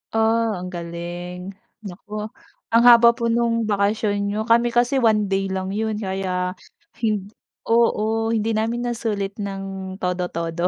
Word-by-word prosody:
Ah, 225 0 +2
ang 180 - -6
galing, 175 +2 -6 0.3
naku 210 +2 -7 0.4
ang 230 +1 +5
haba 235 0 +8
po 235 -1 -1
nung 230 0 +1
bakasyon 205 0 +1
niyo 210 +2 -1
kami 235 +1 +4
kasi 245 +3 +3
1 215 -2 +3
day 195 0 +1
lang 190 0 -2
yun 220 0 -1
kaya 190 -2 -2 0.5
hind 210 -3 -1 0.4
oo, 225 -1 +2
hindi 225 0 0
namin 235 +3 -1
nasulit 210 -4 -2
ng 195 -1 -5
todo-todo. 175 -1 -1
210 Hz, 135 wpm, -22 LUFS, 190-225 Hz, 0.5 s, haba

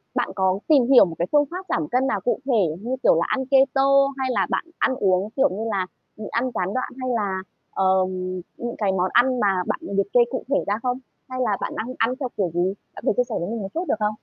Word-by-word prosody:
bạn - - 0
có 190 0 +1
tìm 275 -6 +5
hiểu 260 -6 +8
một 165 -3 -6
cái 175 - 0
phương 295 -1 +4
pháp 370 +1 -6
giảm 300 - 0
cân 255 +2 +1
nào 205 -6 -1
cụ 245 - 0
thể, 205 - +2
như 250 +3 -2
kiểu - - +5
là, 170 - +1
ăn 265 0 -1
keto 270 0 +3 0.3
hay 265 - -1
là - - +1
bạn - - -1
ăn 260 - +2
uống, 190 -1 +1
kiểu 275 +1 +3
như 215 +4 -4
là, 190 -2 -1 0.3
nhịn 215 - -7
ăn 250 +2 0
gián 185 +2 -1
đoạn 255 - -2
hay 255 - -2
là, 195 -3 -1 0.3
ờ, - - -1 0.7
những 240 0 -4
cái 205 -3 +1
món 185 0 0
ăn 250 +1 +4
mà 195 -4 +2
bạn - - -1
liệt 200 0 -1
kê 245 - +6
cụ 260 - -3
thể 285 - +2
ra 205 - +1
không? 250 0 0 0.3
Hay 255 - -5
là 210 -5 +1
bạn - - -3
đang 245 +4 -4
ăn 230 +3 +1
theo 260 -4 -2
kiểu 185 -5 0
gì? 180 +3 +1 0.2
Bạn - - -10
có - - +4
thể - - 0
chia 250 - +4
sẻ - - -3
với 175 +4 -3
mình 230 -1 -3
một 195 - -5
chút 340 +3 -2
được - - +2
không? 210 0 0
230 Hz, 270 wpm, -23 LUFS, 195-260 Hz, 0.7 s, hiểu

